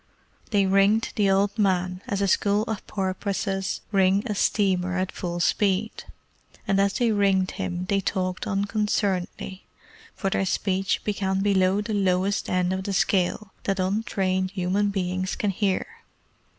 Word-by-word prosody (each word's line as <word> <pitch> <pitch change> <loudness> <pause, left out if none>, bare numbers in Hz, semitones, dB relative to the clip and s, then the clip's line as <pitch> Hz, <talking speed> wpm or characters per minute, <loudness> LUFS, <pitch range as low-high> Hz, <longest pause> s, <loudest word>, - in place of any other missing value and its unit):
They 205 -3 +3
ringed 195 +3 +3
the 205 -3 +2
old 200 +2 +1
man 185 -2 +1
as 200 -4 -1
a - - +2
school 205 +2 +2
of 220 -3 -5
porpoises 195 0 -2
ring 195 0 +3
a 220 - -1
steamer 185 -3 +1
at 185 0 -1
full 175 -1 -4
speed, 200 +4 0 0.6
and 195 0 +3
as 200 0 +2
they 240 -3 +1
ringed 195 -2 +2
him 180 0 -4
they 195 0 +1
talked 185 -1 -2
unconcernedly, 200 -2 -1 0.5
for 195 -2 -2
their 195 - 0
speech 190 0 0
began 195 -2 -1
below 195 0 +2
the 215 +1 -4
lowest 195 0 +1
end 185 0 +1
of 190 0 -3
the 200 - -2
scale 190 +1 0
that 195 -1 0
untrained 190 -1 0
human 195 +1 0
beings 185 -1 -2
can 205 - 0
hear. 195 0 0
195 Hz, 150 wpm, -25 LUFS, 185-205 Hz, 0.6 s, They